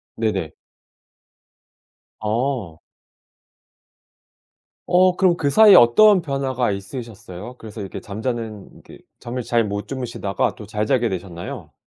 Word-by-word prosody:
네네. 100 -8 -2 1.7
어. 110 - -2 2.0
어. 180 +1 +4
그럼 180 -2 +3
그 145 -2 0
사이에 210 +5 +7
어떤 190 - +6
변화가 135 -6 -1
있으셨어요? 100 +1 -8
그래서 110 -1 -10
이렇게 95 - -6
잠자는 110 -1 -6
그 - - -14 0.2
잠을 125 +1 -5
잘 115 0 +1
못 100 0 -4
주무시다가 120 -6 -2
또 105 - -10
잘 105 0 -2
자게 125 -2 +2
되셨나요? 90 -2 -7
115 Hz, 240 characters per minute, -21 LUFS, 100-135 Hz, 2.0 s, 사이에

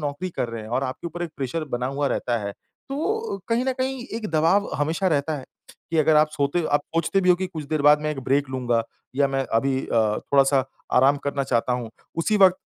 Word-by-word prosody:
नौकरी 150 +5 -3
कर 120 - -1
रहे 115 -1 -6
हैं 110 - -9
और 135 - -1
आपके 130 +6 -5
ऊपर 175 +1 -5
एक 170 - -4
प्रेशर 145 +4 -2
बना 125 +1 -1
हुआ 145 -1 +1
रहता 120 -1 -1
है, 100 - -3
तो 345 - -4
कहीं 230 +2 +1
न 265 - +1
कहीं 260 -1 -2
एक 220 - -4
दबाव 165 +6 +3
हमेशा 160 +6 0
रहता 150 0 0
है 130 - -9 0.5
कि 165 - +1
अगर 155 0 +4
आप 155 0 +5
सोते 150 +3 0
आप 145 - +4
सोचते 170 +4 +2
भी 185 - 0
हो - - +7
कि 185 +1 -2
कुछ 160 -4 -7
देर 155 -2 0
बाद 150 0 +6
मैं 150 - 0
एक 140 -3 -4
ब्रेक 140 0 +1
लूँगा 120 -3 0 0.3
या 140 -1 +3
मैं 135 0 -1
अभी 130 +3 +2
अ, 110 -2 +2
थोड़ा-सा 135 -1 +3 0.3
आराम 135 +3 +5
करना 140 -1 0
चाहता 125 -1 +1
हूँ, 120 -2 -3 0.3
उसी 210 +6 +1
वक़्त 185 -2 +6
145 Hz, 230 wpm, -24 LUFS, 135-175 Hz, 0.5 s, हो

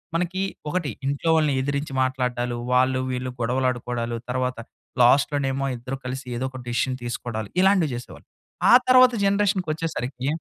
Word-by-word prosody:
మనకి 180 +2 -1 0.3
ఒకటి 175 -6 -1 0.2
ఇంట్లో 140 +4 -1
వాళ్ళని 150 -3 +2
ఎదిరించి 140 0 -3
మాట్లాడ్డాలు, 125 -2 -1 0.2
వాళ్ళు 130 +1 +3
వీళ్ళు 125 0 -3
గొడవలాడుకోడాలు, 120 -1 -1
తరువాత 125 -1 -1 0.5
లాస్ట్‌లోనేమో 135 +1 +2
ఇద్దరు 130 +3 -6
కలిసి 130 +1 -5
ఏదోక 130 0 -4
డెసిషన్ 120 +2 -1
తీసుకోడాలు. 115 -3 -4
ఇలాంటివి 190 -7 +3
చేసేవాళ్ళు. 120 - -10 0.4
ఆ - - +8
తర్వాత 255 0 +7
జనరేషన్‌కొచ్చేసరికి 165 - -1
130 Hz, 120 wpm, -24 LUFS, 125-155 Hz, 0.5 s, ఆ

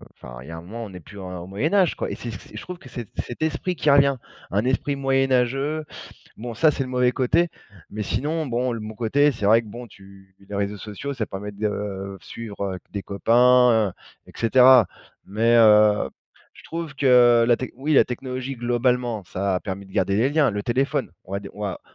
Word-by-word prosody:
enfin, - - -11
il 65 - -12
y - - -8
a - - -6
un - - -8
moment, 115 +6 -7
on - - -9
n'est 90 -2 -10
plus 100 +5 -13
en 90 -1 -7
au 90 - -10
Moyen 120 - -2
Âge, 190 -5 +3
quoi - - -3
et - - -4
c'est 120 - -7
c'est 105 0 -11
je 105 - -6
trouve 180 0 -8
que 190 - -15
c'est 120 -5 -8
cet 120 - -5
esprit 160 +3 -1
qui 155 - 0
revient. 140 -1 +5 0.4
Un 100 +3 +1
esprit 130 +3 0
moyenâgeux. 135 +2 +1 0.5
Bon, 120 +1 -6
ça, 155 +4 +4
c'est 135 - -2
le 130 - -5
mauvais 125 -1 +2
côté 165 +7 +1 0.4
mais 105 +1 -4
sinon, 150 +10 -2
bon, 125 0 -1
le 115 - -5
bon 110 +1 -7
côté, 140 +6 +3
c'est 110 -6 -3
vrai 115 +2 +5
que - - -15
bon, 120 +3 -9
tu 95 -2 -17
les 100 +1 -10
réseaux 100 +1 -2
sociaux, 105 +7 -6
ça 115 -4 -2
permet 105 +2 -6
de 100 -2 -4
suivre, 105 -3 -7
heu, - - -6
des 100 - -5
copains, 115 0 +4 0.3
et - - -15
cetera, 125 -1 +6 0.4
mais 115 +4 +1
heu, 105 -2 +5 0.4
je - - -17
trouve 165 -2 -6
que 125 -4 +5
la 120 - +5
tech 130 - -5
oui, 145 +4 -1
la - - +6
technologie, 130 +1 -5
globalement, 120 -2 0
ça 95 +3 -2
a 90 - -1
permis 100 -1 -6
de 95 - -17
garder 100 -1 +1
les 115 +5 +3
liens. 145 -3 +3
Le 105 -1 -3
téléphone, 135 +1 -1
on 95 - -12
va 100 - -2
dire, 100 - -10
on 105 - -8
va 95 -3 -4
115 Hz, 225 wpm, -23 LUFS, 100-135 Hz, 0.5 s, cetera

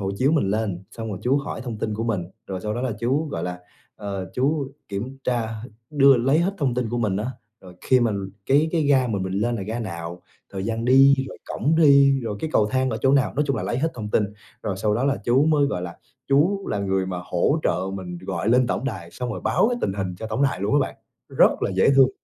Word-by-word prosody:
hộ 95 -1 -2
chiếu 135 +6 +2
mình 145 -12 +2
lên, 100 -4 -2
xong 115 -1 -6
rồi 95 - -4
chú 130 +3 +2
hỏi 140 -5 -5
thông 115 -4 -5
tin 110 -1 -2
của 115 +2 -3
mình 105 -7 -1 0.2
rồi 95 -2 -5
sau 105 0 -3
đó 120 - -3
là 130 - -1
chú, 140 +6 0
gọi 85 - -4
là, 90 0 -4 0.4
ờ, 100 -3 -5
chú 140 +1 0 0.2
kiểm 120 +7 -5
tra 120 -3 0 0.4
đưa 140 -3 +6
lấy 135 +6 +2
hết 190 +4 +1
thông 135 -6 0
tin 125 -2 -1
của 120 - -1
mình 105 -5 0
á, 105 - -2 0.3
rồi 90 -1 -13
khi 130 -1 +3
mà 115 -2 +2 0.4
cái 145 +4 +3
cái 165 - +2
ga 135 -3 +3
mà 105 -3 -1
mình 95 0 -3
lên 115 +5 0
là 100 - -4
ga 110 +4 -4
nào, 85 -5 -6 0.3
thời 95 -1 -4
gian 115 +1 -2
đi, 135 +2 +7
rồi - - -10
cổng 155 +4 0
đi, 140 -3 +6
rồi 105 -3 -3
cái 160 - -3
cầu 105 - +4
thang 130 -1 +1
ở 110 - -2
chỗ 135 - +4
nào, 140 -2 +2
nói 150 - +1
chung 135 -4 0
là - - -3
lấy 120 - -2
hết 160 +3 0
thông 110 -4 -5
tin. 105 - +2 0.4
Rồi 100 -3 -2
sau 105 +2 0
đó 120 +5 0
là 140 0 +2
chú 130 +4 +4
mới, 150 -3 +3
gọi 90 -10 -3
là, 85 -1 -7 0.3
chú 175 +9 +2
là 105 - -1
người 95 -1 0
mà 90 -1 -4
hỗ 90 - +1
trợ - - +1 0.2
mình 90 -2 -6
gọi 95 +1 -3
lên 125 +1 +4
tổng 125 - -2
đài 95 -10 -5
xong 125 -1 -5
rồi - - -5
báo 225 - +2
cái 245 - -1
tình - - 0
hình 95 -2 -3
cho 110 - -5
tổng 110 +5 -1
đài 140 -8 +1
luôn 100 +6 0
á, 145 - +5
bạn, - - -2 0.3
rất - - +3
là - - +1
dễ 95 +7 +3
thương. 135 -1 +7
120 Hz, 265 wpm, -23 LUFS, 100-135 Hz, 0.4 s, đi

